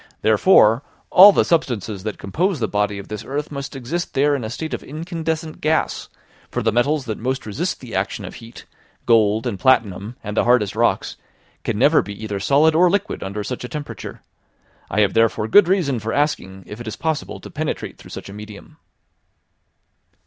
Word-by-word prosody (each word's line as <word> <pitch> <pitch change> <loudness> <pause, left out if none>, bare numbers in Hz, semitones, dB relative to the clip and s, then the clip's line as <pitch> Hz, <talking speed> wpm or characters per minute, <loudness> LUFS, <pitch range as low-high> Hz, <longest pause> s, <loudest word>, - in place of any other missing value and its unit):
Therefore, 110 - +5 0.3
all 195 +3 +10
the - - +2
substances 115 - -1
that 110 +2 -5
compose 170 - -1
the 110 - 0
body 105 0 -1
of 100 - -8
this 105 -1 -6
earth 145 +3 -4
must 140 -1 -6
exist 140 +7 -4
there 145 +2 +3
in 135 -4 -2
a 110 - -4
state 155 +7 -5
of - - -3
incandescent 160 0 -4
gas; 155 +1 0 0.4
for - - -3
the 115 - +2
metals 135 +5 +1
that 110 -3 -4
most 130 +3 -2
resist 150 - -3
the 125 -4 -10
action 95 +1 -2
of - - -8
heat, 115 0 -12 0.4
gold, 110 -1 +3
and 110 -6 -3
platinum, 110 -4 +1
and 105 -1 -5
the - - +3
hardest 120 -5 +3
rocks, - - 0 0.5
can - - -2
never - - +5
be 100 - -7
either 105 -2 -3
solid 145 +9 +4
or 175 +3 +5
liquid 200 +2 -1
under 100 +2 -4
such 125 +4 -5
a 125 - -6
temperature. 125 -6 -7 0.7
I 105 - +1
have 100 -2 +2
therefore 115 -1 +2
good 190 - +6
reason 170 -10 +1
for 110 +1 -4
asking 95 -10 -1
if 105 +6 -9
it 120 - -8
is 110 - -4
possible 160 -2 -3
to - - -11
penetrate - - -4
through - - -13
such - - -8
a 100 - -9
medium." 105 0 -11
120 Hz, 190 wpm, -21 LUFS, 105-155 Hz, 0.7 s, all